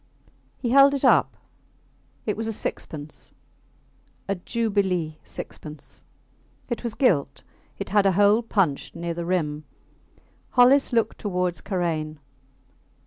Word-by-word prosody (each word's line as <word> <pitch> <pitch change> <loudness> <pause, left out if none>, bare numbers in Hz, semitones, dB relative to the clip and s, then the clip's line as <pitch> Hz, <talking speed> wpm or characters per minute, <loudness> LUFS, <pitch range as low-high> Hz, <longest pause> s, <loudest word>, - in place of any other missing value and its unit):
He 240 - -2
held 275 +1 +7
it 275 - -1
up. - - +4 0.9
It 210 - -1
was 225 +1 -3
a 225 - -2
sixpence 150 -6 -6 0.9
a 195 - +1
Jubilee 190 -6 -1
sixpence. 150 -1 -9 0.7
It 240 - -2
was 235 -2 -3
gilt; 145 - +1 0.3
it 200 - -5
had 200 0 +4
a 190 - +3
hole 205 +4 +4
punched 195 -11 -1
near 170 0 -3
the 170 0 -4
rim. 155 -4 -1 0.9
Hollis 265 +3 +6
looked 230 -2 0
towards 180 -3 -1
Karain. 160 -5 -2
190 Hz, 120 wpm, -24 LUFS, 165-225 Hz, 0.9 s, held